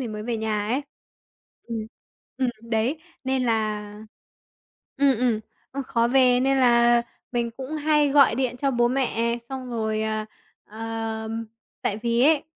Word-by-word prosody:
thì 250 - -3
mới 210 -1 -5
về 230 +1 -2
nhà 215 -2 -1
ấy. 255 +5 +1 0.9
Ừm, 230 -1 -2 0.6
ừm, 240 -3 -3
đấy, 235 +8 0 0.2
nên 260 -1 0
là 215 -3 0 1.1
ừm, 275 -2 +4
ừm, 240 -3 +1 0.3
ơ, 275 +1 -3
khó 235 -1 +2
về 250 -1 +5
nên 270 +1 +2
là 240 -1 +5 0.3
mình 235 -1 0
cũng 265 +5 -7
hay 300 -1 +3
gọi 275 -5 +6
điện 250 0 -1
cho 275 +2 0
bố 240 -2 +3
mẹ, 235 -2 0
xong 260 -2 -6
rồi 220 -2 -1
ờ, 215 0 -1 0.4
ờ, 225 0 -4
ừm, 225 +1 -4 0.4
tại 200 - 0
vì 235 +1 +1
ấy, 295 +1 +5
235 Hz, 160 wpm, -25 LUFS, 225-265 Hz, 1.1 s, gọi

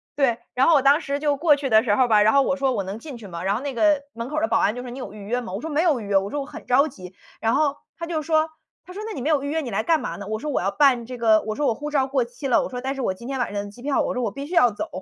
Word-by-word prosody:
对， 260 -5 +2 0.2
然 255 +2 +3
后 335 - +6
我 280 - +5
当 285 +4 +5
时 280 -1 -2
就 290 -1 +1
过 300 -1 +4
去 280 -1 -3
的 220 -1 +6
时 205 -4 +2
候 255 - +3
吧， 215 -3 +4
然 215 +1 +4
后 275 0 +5
我 275 - 0
说： 275 -1 0
“我 200 - -1
能 195 +3 -6
进 270 -1 -9
去 225 - -12
吗？” 170 -3 -7
然 195 +2 +1
后 230 - -3
那 280 -1 -4
个 300 +4 +3
门 230 +2 -6
口 305 +1 -1
的 330 - +2
保 - - +2
安 215 - +1
就 245 - -6
说： 250 - -7
“你 255 - -8
有 - - -7
预 205 -1 -10
约 245 +4 -1
吗？” 190 -6 -7
我 200 - -3
说： 320 +4 -6
“没 295 +2 +2
有 315 -8 +2
预 215 - -7
约， 200 - -3
“我 195 +1 -5
说：” 290 - -4
我 275 - -5
很 295 - -10
着 275 +5 +4
急。 185 -8 -11 0.3
“然 225 +2 +2
后， 285 -1 +2 0.2
他 335 - -4
就 330 -2 -2
说 315 0 +1 0.3
他 365 - -11
说： 410 - -6
“那 - - -5
你 - - -5
没 300 - 0
有 300 -3 +2
预 285 - -4
约 320 +2 0
你 255 -6 -6
来 200 - 0
干 320 +6 +2
嘛 - - -5
呢？” 200 - -8
我 215 - -1
说： 300 +6 -4
“我 - - +1
要 190 - 0
办 245 +1 +3
这 250 0 -7
个” 220 -2 +4
我 215 - -2
说： 295 - -1
“我 - - +2
护 295 +6 -6
照 280 -3 +1
过 265 -2 0
期 245 +4 -10
了。 250 - +4
“我 - - -4
说： 250 - -5
“但 265 +1 -2
是 270 - -5
我 210 - 0
今 235 +5 -10
天 270 -1 -3
晚 245 - -1
上 205 0 -3
的 200 - -10
机 240 - -15
票。” 280 0 +1
我 - - -2
说： 250 - -2
“我 215 - -1
必 275 +6 -7
须 325 - -8
要 330 -9 +5
走。” 205 - -5
260 Hz, 410 characters per minute, -23 LUFS, 220-290 Hz, 0.3 s, 后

